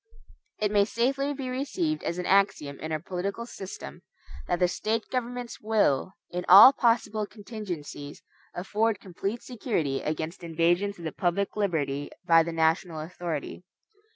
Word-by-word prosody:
It 210 -1 0
may 205 -1 +5
safely 270 +6 0
be 270 -2 -5
received 300 +4 -1
as 170 - -3
an 180 - -3
axiom 190 -8 +2
in 155 - -5
our 155 - +1
political 190 +7 -4
system, 190 - -8 0.5
that 175 - +1
the 180 0 +3
State 220 +5 -2
governments 245 -1 -4
will, 205 -7 +1 0.2
in 180 +1 -3
all 205 +9 +11
possible 220 -4 +1
contingencies, 185 -10 -7 0.3
afford 210 +3 0
complete 195 +5 -5
security 190 - -2
against 155 +3 -4
invasions 175 +5 +1
of 170 - -11
the 160 - -3
public 180 +5 -1
liberty 145 -9 -1 0.2
by 165 -1 +6
the 170 +1 -2
national 160 0 +1
authority. 165 0 -5
190 Hz, 145 wpm, -27 LUFS, 165-225 Hz, 0.5 s, all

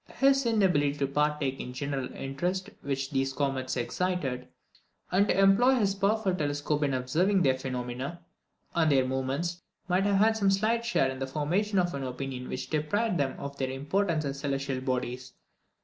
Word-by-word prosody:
His 270 -1 +4
inability 180 -11 +3
to 140 - +1
partake 145 -1 0
in - - -5
the 125 - -7
general 135 0 -3
interest 180 +9 -3
which 135 0 -3
these 135 -1 0
three - - -18
comets 135 -3 -1
excited, 130 -2 -2 0.6
and 195 +3 +3
to - - +2
employ 195 +7 +5
his 205 -5 +2
powerful 200 0 +1
telescope 145 -2 -1
in 140 -2 +1
observing 175 +10 +2
their 135 - +4
phenomena, 130 +4 -4 0.5
and 160 -2 +3
their 135 -2 +4
movements, 135 +7 -2 0.3
might 185 +2 +2
have 200 -1 +3
had 220 +2 +4
some 200 -3 +2
slight 215 +4 +2
share 235 - +2
in 130 - -7
the 135 - -2
formation 175 +9 0
of 175 -1 +2
an 140 - -3
opinion 130 0 -5
which 130 0 -5
deprived 180 +6 0
them 135 -2 -1
of 140 0 -6
their 130 -1 0
importance 155 +4 0
as 140 0 -3
celestial 135 -2 -2
bodies. 130 -1 -3
145 Hz, 180 wpm, -29 LUFS, 135-195 Hz, 0.6 s, employ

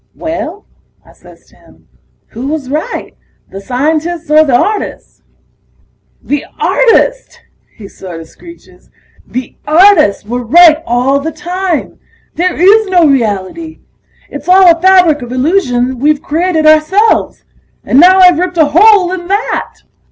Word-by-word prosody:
"Well," 330 +4 -6 0.4
I - - -20
says - - -20
to - - -25
him, - - -24 0.4
"who 245 +4 -7
was 285 -3 -5
right, 305 +2 -5 0.4
the 195 - -9
scientists 310 - -3
or 310 +1 +5
the 275 -5 0
artists?" 415 - -3 1.0
"The 290 0 -3 0.2
artists!" - - 0 0.4
he 210 -4 -12
sorta 170 -4 -11
screeches. 335 - -18 0.4
"The 255 0 -7
artists 310 - +3
were 245 +3 -5
right 320 +5 +4
all 250 +4 0
the 315 +3 -5
time... 355 +1 -5 0.3
there 360 +1 -2
is 415 +4 +4
no 360 -3 +2
reality! 265 - -3 0.5
It's 285 +4 -9
all 365 -2 +5
a 330 - -15
fabric 360 -6 +3
of 245 0 -9
illusion 255 -3 -1
we've 295 +2 0
created 325 +1 -1
ourselves! 310 +8 +1 0.4
And 260 - +1
now 370 +3 +5
I've 360 -3 +5
ripped 360 -1 -3
a 315 - +4
hole 390 0 +4
in 360 -2 -6
that!" 405 +4 -4
320 Hz, 135 wpm, -10 LUFS, 270-365 Hz, 1.0 s, or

